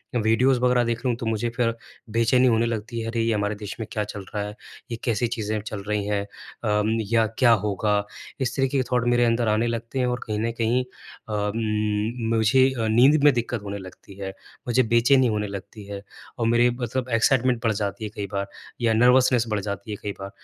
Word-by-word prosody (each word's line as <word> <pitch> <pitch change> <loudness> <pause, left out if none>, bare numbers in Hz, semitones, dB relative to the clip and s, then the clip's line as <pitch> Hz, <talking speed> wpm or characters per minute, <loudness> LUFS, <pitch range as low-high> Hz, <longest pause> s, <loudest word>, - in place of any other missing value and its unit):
अ, - - +3
videos 120 +4 +3
वग़ैरह 125 0 +3
देख 115 +2 -2
लूँ, 125 - +2
तो 115 - -6
मुझे 110 +1 -1
फिर 115 -2 +2 0.4
बेचैनी 115 +3 +3
होने 115 -1 +3
लगती 115 0 -3
है, 115 - -4
अरे, 115 0 -1
ये 115 0 +1
हमारे 105 0 -1
देश 105 -1 -7
में 110 - -4
क्या 105 - -1
चल 100 -1 -7
रहा 105 - 0
है, 105 - -8 0.4
ये 115 - -3
कैसी 120 -1 +1
चीज़ें 110 -2 -2
चल 105 -1 -6
रही 105 -1 -1
हैं - - -2
अ, 105 +1 -3
म 110 +1 +1 0.2
या 115 -1 +4
क्या 125 -3 +6
होगा, 105 0 0 0.4
इस 130 -1 -1
तरीके 135 +1 +1
के 130 - +2
थॉट 125 -1 +2
मेरे 120 0 +3
अंदर 115 0 +1
आने 110 +2 +2
लगते 115 +3 -3
हैं। 125 - +2
और 125 0 -1
कहीं 105 -1 -2
न 115 +2 0
कहीं 120 +3 +2 0.5
अ, - - -3
उम, 105 +2 -1
मुझे 130 +4 +4
अ, 110 - 0
नींद 130 +7 +5
में 145 -1 +7
दिक्कत 120 -1 -2
होने 100 0 -5
लगती 95 0 -12
है, 95 -1 -4 0.4
मुझे 125 +2 +3
बेचैनी 125 +2 +5
होने 105 -2 -1
लगती 100 +2 -8
है, 100 -1 -7 0.4
और 115 - 0
मेरे 120 +1 +4
मतलब 125 +1 -3
एक्साइटमेंट 125 +1 +3
बढ़ 115 - +3
जाती 105 +1 -3
है 105 - -3
कई 100 -1 -4
बार, 100 0 -1 0.3
या 115 -1 +3
नर्वसनेस 125 +1 +4
बढ़ 105 -1 0
जाती 100 +3 -5
है 105 - -4
कई 105 - -2
बार। 100 0 -6
115 Hz, 225 wpm, -24 LUFS, 105-120 Hz, 0.5 s, में